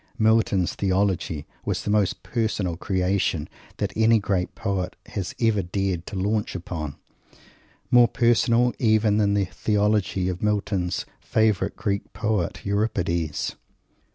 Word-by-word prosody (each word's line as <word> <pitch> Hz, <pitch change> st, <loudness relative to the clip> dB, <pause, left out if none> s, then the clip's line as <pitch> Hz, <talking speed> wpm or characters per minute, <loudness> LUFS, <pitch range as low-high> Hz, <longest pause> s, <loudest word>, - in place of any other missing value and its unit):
Milton's 110 Hz, -5 st, +3 dB
Theology 95 Hz, -6 st, 0 dB, 0.2 s
was -, -, -2 dB
the 105 Hz, -, -1 dB
most 105 Hz, -4 st, +1 dB
personal 105 Hz, -4 st, -1 dB
creation 90 Hz, -3 st, 0 dB, 0.3 s
that -, -, -2 dB
any 110 Hz, +1 st, +5 dB
great 95 Hz, -3 st, -1 dB
poet 100 Hz, -4 st, -2 dB
has 95 Hz, -1 st, -4 dB
ever 115 Hz, -3 st, +2 dB
dared 95 Hz, -1 st, -2 dB
to 100 Hz, -, -6 dB
launch 105 Hz, +3 st, -1 dB
upon 80 Hz, -5 st, -5 dB, 1.0 s
more 120 Hz, -1 st, +7 dB
personal 120 Hz, +1 st, +3 dB
even 110 Hz, -3 st, +3 dB
than 100 Hz, -1 st, +2 dB
the 100 Hz, -1 st, +2 dB
Theology 105 Hz, -1 st, 0 dB
of 90 Hz, -1 st, -3 dB
Milton's 100 Hz, -4 st, 0 dB
favourite 105 Hz, -3 st, +1 dB
Greek 100 Hz, -1 st, -3 dB
poet, 105 Hz, -5 st, -1 dB
Euripides. 90 Hz, -6 st, -1 dB
100 Hz, 125 wpm, -24 LUFS, 90-110 Hz, 1.0 s, more